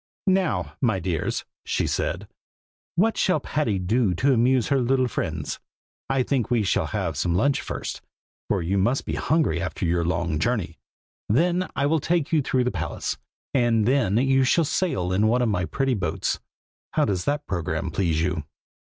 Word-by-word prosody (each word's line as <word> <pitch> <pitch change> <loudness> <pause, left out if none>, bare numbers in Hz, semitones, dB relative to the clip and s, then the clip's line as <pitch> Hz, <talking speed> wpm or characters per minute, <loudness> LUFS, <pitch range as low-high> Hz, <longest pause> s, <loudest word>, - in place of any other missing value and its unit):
"Now, 170 - +1
my 110 -7 +2
dears," 90 -4 -2 0.2
she - - 0
said, - - -2 0.7
"what 220 +6 +2
shall 185 - +2
Patty 145 -10 -1
do 95 +1 +1
to 135 +9 +3
amuse 125 +1 +3
her 140 -2 +3
little 130 +1 +2
friends? - - -3 0.5
I 135 -1 +2
think 130 -3 0
we 120 -4 +2
will - - 0
have 95 -7 -2
some 85 +3 0
lunch 140 +9 +2
first, - - -5 0.5
for 100 -4 +1
you 95 +4 0
must 120 +8 +1
be - - -3
hungry 150 - +1
after 95 +1 -3
your 85 0 +1
long 80 -3 -1
journey. 95 -3 -1 0.5
Then 175 - +2
I 140 - +1
will 160 +2 +2
take 165 0 0
you 155 - +4
through 130 -1 +1
the 125 - 0
palace, 80 -4 -3 0.3
and 120 -4 +3
then 120 -5 +2
you 135 +1 +3
shall 160 +6 +3
sail 100 - 0
in 105 +4 +3
one 125 +3 +3
of 120 - +2
my 90 -4 0
pretty 135 - 0
boats. 105 - -1 0.5
How - - +3
does 95 -3 -1
that 145 +1 -1
programme 90 0 -2
please 80 -3 +1
you?" 90 -3 -1
115 Hz, 175 wpm, -24 LUFS, 90-135 Hz, 0.7 s, you